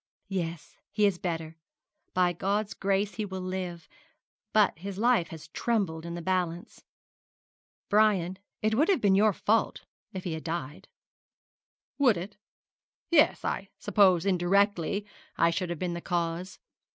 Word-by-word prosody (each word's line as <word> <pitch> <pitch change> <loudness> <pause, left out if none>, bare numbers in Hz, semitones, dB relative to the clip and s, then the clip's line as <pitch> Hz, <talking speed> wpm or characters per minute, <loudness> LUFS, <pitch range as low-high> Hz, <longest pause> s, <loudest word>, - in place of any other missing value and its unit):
'Yes, 170 -4 -4
he 210 0 +2
is 195 -4 +1
better. 165 -3 -4 0.6
By 180 -1 +3
God's 200 +4 -1
grace, 195 +1 0
he 220 - -3
will 190 -2 -5
live; 185 -2 -5 0.6
but 210 -6 +3
his 195 +1 -6
life 230 -5 +3
has 160 -2 -10
trembled 175 -7 -1
in 170 - -5
the 175 - -6
balance. 180 -2 -2 1.0
Brian, 200 -3 +3 0.2
it 215 0 +2
would 295 - +3
have 385 - +4
been 200 -4 +3
your 210 +2 +5
fault 215 +3 0 0.3
if 185 -1 -6
he 175 - -3
had 160 - -5
died.' 160 -4 -5 1.1
'Would 250 -8 +5
it? 190 +4 -6 0.8
Yes, 320 -2 +4
I - - -2
suppose 190 -4 +3
indirectly 200 +1 +2 0.3
I 170 - +4
should 180 +1 -2
have 175 - -3
been 180 +1 -2
the 170 - -5
cause. 175 +1 -2
185 Hz, 145 wpm, -28 LUFS, 170-205 Hz, 1.1 s, your